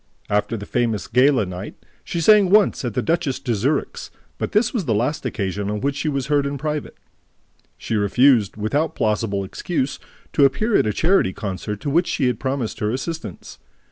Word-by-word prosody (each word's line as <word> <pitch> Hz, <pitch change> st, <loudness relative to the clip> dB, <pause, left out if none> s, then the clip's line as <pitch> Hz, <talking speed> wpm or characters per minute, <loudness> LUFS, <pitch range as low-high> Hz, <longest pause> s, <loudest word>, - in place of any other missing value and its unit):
After 105 Hz, +2 st, 0 dB
the 100 Hz, -, -7 dB
famous 115 Hz, -6 st, -1 dB
gala 125 Hz, -1 st, +3 dB
night, 90 Hz, 0 st, -7 dB, 0.3 s
she 170 Hz, -, -3 dB
sang 205 Hz, +2 st, +6 dB
once 205 Hz, -5 st, +4 dB
at 120 Hz, -4 st, -3 dB
the -, -, 0 dB
Duchess 165 Hz, -5 st, 0 dB
de 120 Hz, -, -2 dB
Zurich's; 135 Hz, +8 st, -1 dB, 0.3 s
but -, -, -2 dB
this 215 Hz, +2 st, +2 dB
was 215 Hz, -9 st, -1 dB
the 115 Hz, -6 st, +1 dB
last 140 Hz, +8 st, -1 dB
occasion 100 Hz, -1 st, -3 dB
on 105 Hz, 0 st, -2 dB
which 140 Hz, +4 st, -1 dB
she 155 Hz, -, -1 dB
was 140 Hz, -3 st, -2 dB
heard 145 Hz, -1 st, +1 dB
in 140 Hz, 0 st, -3 dB
private. 150 Hz, +1 st, -4 dB, 0.8 s
She -, -, -5 dB
refused, 110 Hz, +1 st, +3 dB
without 140 Hz, +10 st, -1 dB
plausible 105 Hz, -2 st, 0 dB
excuse, 135 Hz, -, -3 dB, 0.3 s
to 145 Hz, -, +4 dB
appear 200 Hz, -, +2 dB
at -, -, +3 dB
a -, -, +1 dB
charity 160 Hz, -, +2 dB
concert 100 Hz, +1 st, -5 dB
to 145 Hz, -, -2 dB
which 170 Hz, +4 st, +2 dB
she -, -, 0 dB
had 125 Hz, -3 st, 0 dB
promised 130 Hz, -4 st, -3 dB
her 105 Hz, -, 0 dB
assistance. 130 Hz, -, -5 dB
130 Hz, 190 wpm, -21 LUFS, 105-150 Hz, 0.8 s, sang